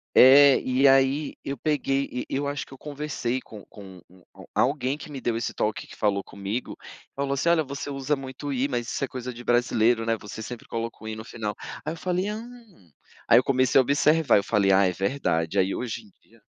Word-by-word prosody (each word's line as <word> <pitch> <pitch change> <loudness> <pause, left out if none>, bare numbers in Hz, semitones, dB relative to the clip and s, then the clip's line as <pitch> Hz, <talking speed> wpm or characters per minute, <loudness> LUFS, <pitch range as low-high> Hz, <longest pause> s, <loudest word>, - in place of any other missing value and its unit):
É, 140 +1 +8
e 130 +2 +3
aí 135 +2 +2
eu 140 0 -3
peguei, 140 -1 0
e 125 - -4
eu 140 +1 -2
acho 145 0 -4
que - - -19
eu - - -14
conversei 145 -4 -3
com 105 -5 -12
com 95 -3 -13
u 90 0 -21 0.2
um - - -10
alguém 135 +1 0
que - - -10
me 135 -2 -6
deu 120 -2 -1
esse 115 - -3
toque, 105 0 -2
que - - -13
falou 100 -2 0
comigo, 100 +5 -5 0.4
falou 140 0 -1
assim: 140 +5 0
"Olha, 170 -2 +4
você 140 0 -6
usa 140 +1 -1
muito 135 +1 -7
o - - -2
i, 130 +1 +1
mas 120 -4 -3
isso - - -2
é - - -1
coisa 125 0 -6
de 120 0 -11
brasileiro, 120 -1 +2
né, 115 0 +1
você 105 +2 -8
sempre 120 +1 -8
coloca 115 0 -4
o - - -7
i 110 - -4
no 110 +1 -8
final". 110 -3 -5 0.3
Aí 155 - -2
eu - - -7
falei: 180 +3 -1
"Hum", 225 - -11 0.4
aí 120 - +8
eu 125 - +2
comecei 130 -1 +3
a - - +7
observar, 145 +1 +3
eu - - 0
falei: 100 -3 +2
"Ah, 95 +1 +5
é - - +2
verdade", 95 -7 0
aí 95 +1 0
hoje 115 -2 -4
em 105 - -20
dia 115 0 -25
130 Hz, 230 wpm, -25 LUFS, 110-140 Hz, 0.4 s, É